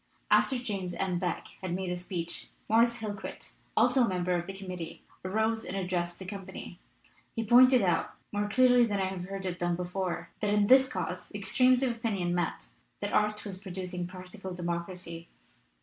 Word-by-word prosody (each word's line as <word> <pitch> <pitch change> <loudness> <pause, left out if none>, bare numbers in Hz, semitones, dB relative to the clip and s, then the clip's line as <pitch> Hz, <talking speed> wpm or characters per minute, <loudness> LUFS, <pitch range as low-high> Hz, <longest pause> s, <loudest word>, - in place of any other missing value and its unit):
After 265 - +5
James 195 -7 -3
M. 185 -2 0
Beck 180 -2 -2 0.2
had 185 -2 -2
made 185 -1 -2
a - - 0
speech, 175 -1 -4 0.2
Morris 235 +2 +4
Hillquit, 210 -1 -6 0.3
also 250 +3 +5
a - - +3
member 180 -1 0
of 175 -1 -1
the 195 0 -6
committee, 180 -4 -6 0.2
arose 220 +4 0
and 195 - -4
addressed 175 -2 -1
the 190 - -8
company. 190 -2 -7 0.6
He 225 - 0
pointed 250 +2 +7
out 175 -3 +1 0.2
more 205 0 -1
clearly 250 +2 +6
than 205 -4 +1
I 190 - +2
have 185 -1 -4
heard 195 0 -5
it 180 -1 -3
done 175 0 +1
before 180 0 -3
that 210 -1 0
in 205 0 +4
this 265 +4 +7
cause - - -4
extremes 255 0 +3
of 255 - +2
opinion 205 -7 -1
met, 170 - -2 0.3
that - - -3
art 210 0 +1
was 190 -2 -5
producing 180 -2 -4
practical 185 0 -8
democracy. 170 -1 -4
190 Hz, 180 wpm, -30 LUFS, 180-220 Hz, 0.6 s, pointed